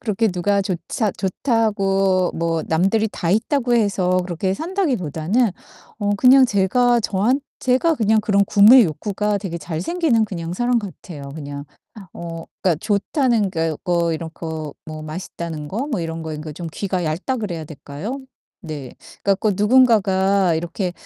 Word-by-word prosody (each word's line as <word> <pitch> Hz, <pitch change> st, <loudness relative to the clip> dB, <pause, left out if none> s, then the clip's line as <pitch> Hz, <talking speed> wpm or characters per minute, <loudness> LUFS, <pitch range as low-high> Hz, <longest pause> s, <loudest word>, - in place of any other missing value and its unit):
그렇게 225 Hz, 0 st, 0 dB
누가 200 Hz, +2 st, +1 dB
조차 195 Hz, +3 st, -2 dB
좋다고 195 Hz, -3 st, +1 dB
뭐 165 Hz, -1 st, -1 dB
남들이 195 Hz, +7 st, +2 dB
다 170 Hz, -, -2 dB
있다고 240 Hz, -, +1 dB
해서 190 Hz, -4 st, +1 dB
그렇게 185 Hz, +2 st, -1 dB
산다기보다는 240 Hz, -, 0 dB, 0.5 s
어 205 Hz, 0 st, 0 dB
그냥 260 Hz, +5 st, +7 dB
제가 240 Hz, +4 st, +2 dB
저한 220 Hz, +7 st, +1 dB, 0.2 s
제가 260 Hz, +6 st, +2 dB
그냥 220 Hz, -4 st, +2 dB
그런 200 Hz, -1 st, +2 dB
구매 215 Hz, +6 st, +7 dB
욕구가 205 Hz, +5 st, -1 dB
되게 185 Hz, -4 st, -5 dB
잘 160 Hz, 0 st, -5 dB
생기는 290 Hz, -, +1 dB
그냥 170 Hz, -5 st, -5 dB
사람 240 Hz, +5 st, +1 dB
같아요 175 Hz, -8 st, -9 dB
그냥. 145 Hz, -2 st, -7 dB, 0.5 s
어 165 Hz, -1 st, -7 dB, 0.2 s
그니까 180 Hz, -3 st, +3 dB
좋다는 215 Hz, +1 st, +1 dB
게 165 Hz, -2 st, -1 dB
거 175 Hz, -1 st, +1 dB
뭐 170 Hz, -1 st, +1 dB
이런 160 Hz, +1 st, -4 dB
거 160 Hz, -3 st, -6 dB
뭐 155 Hz, -1 st, -7 dB
맛있다는 155 Hz, -1 st, -6 dB
거 235 Hz, -, -3 dB
뭐 255 Hz, -11 st, -2 dB
이런 165 Hz, 0 st, -4 dB
거 160 Hz, -, -5 dB
그러니까 155 Hz, 0 st, -6 dB
좀 170 Hz, +3 st, -7 dB
귀가 185 Hz, -3 st, -2 dB
얇다 170 Hz, -, -2 dB
그래야 180 Hz, -9 st, -4 dB
될까요? 150 Hz, -, -7 dB, 0.4 s
네. 150 Hz, -6 st, -7 dB, 0.3 s
그니까 200 Hz, -1 st, +2 dB
꼭 210 Hz, +2 st, +1 dB
누군가가 200 Hz, -5 st, +3 dB
이렇게 175 Hz, +3 st, -3 dB
195 Hz, 320 characters per minute, -21 LUFS, 165-220 Hz, 0.5 s, 그냥